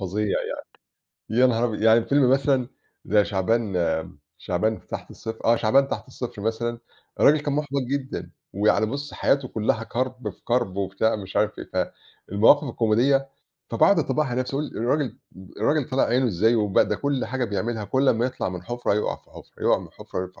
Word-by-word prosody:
فظيع، 100 +3 -2
يعني 100 - -3 0.8
يا 130 - +8
نهار 115 -1 +1
أبيض، 110 -3 -2
يعني 115 +1 +5
فيلم 140 -3 +3
مثلًا 135 -2 +2 0.4
زي 105 -1 +3
شعبان 100 +1 0 0.6
شعبان 110 +5 -1
تحت - - -7
الصفر 110 0 -8
آه 115 +1 +5
شعبان 135 +6 +3
تحت - - -5
الصفر 125 -5 -6
مثلًا 115 +2 -2 0.4
الراجل 150 +1 +6
كان 145 -1 -2
محْبط 140 -1 -1
جدًا 140 -2 -3 0.2
ويعني 105 +1 +2
بُصّ 140 +5 -5
حياته 135 -2 +1
كلّها 110 0 -1
كرْب 125 -2 -3
في - - -19
كرْب 120 -6 0
وبتاع 100 +3 0
مش 95 -2 -8
عارف 105 0 +2
إيه، - - -2 0.4
فالمواقف 110 +9 +5
الكوميدية 125 +5 +2 0.4
فباقعد 155 - +4
اطبّقها 155 0 +1
على 125 0 -1
نَفْسي، 125 +1 -4
أقول 150 - -1
الراجل 130 +1 -1 0.4
الراجل 145 +5 +1
طالع 130 - +2
عينه 125 +2 +2
إزاي 110 +2 +2
وبَ 105 -4 +1
ده - - +3
كل 140 -2 -1
حاجة 130 0 -2
بيعملها، 110 +1 -2
كل 130 +6 +1
أمّا 115 +1 +3
يطلَع 130 - -3
من 90 -1 -6
حفرة 120 +2 -1
يُقع 105 - -1
في - - -27
حفرة، - - -14
يُقع - - +4
من - - -10
حفرة، - - -8
يُقع 90 - -13
120 Hz, 180 wpm, -24 LUFS, 105-130 Hz, 0.8 s, يا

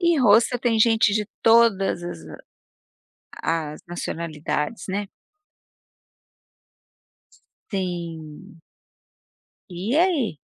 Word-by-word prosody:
E 340 -3 +3
Hostel 235 +2 +4
tem 230 -2 +1
gente 220 -2 +4
de 210 -2 0 0.2
todas 225 -6 +4
as 175 - -6 1.0
a 160 -2 -3
as 150 - -11
nacionalidades, 165 +1 -4
né. 200 +2 -2 2.6
Tem. 170 -5 -6 1.1
E 185 +8 -3
aí? 310 - +1
195 Hz, 80 wpm, -23 LUFS, 165-230 Hz, 2.6 s, Hostel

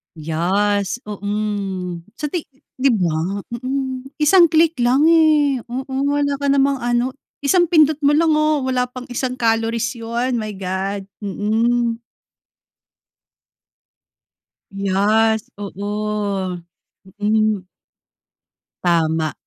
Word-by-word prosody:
Yes, 190 +7 0
mm. 200 -4 -3
Sa 300 - -4
ti 345 -4 -3 0.3
'di 270 +1 +4
ba? 180 +2 -1
Mm, 260 +1 -3 0.2
isang 345 +3 +7
click 325 0 +3
lang 245 +4 +3
eh. 305 -5 +4
Oo 265 +2 -5 0.2
wala 285 -1 0
ka 280 - -1
namang 275 0 +2
ano, 240 +1 0 0.3
isang 350 +5 +4
pindot 310 -3 +4
mo 290 - +5
lang, 325 +1 +3
oh. 305 -2 +2
Wala 255 -1 0
pang 250 0 -10
isang 255 +1 -2
calories 230 -1 0
'yon, 235 +2 -2
my 215 -1 -4
God. 190 +1 -3 0.2
Mm. 230 +3 0 2.7
Yes, 210 +3 +1
oo. 205 -2 -3 0.6
Mm. 215 -1 +1 1.2
Tama. 160 -3 +1
230 Hz, 100 wpm, -20 LUFS, 200-270 Hz, 2.7 s, isang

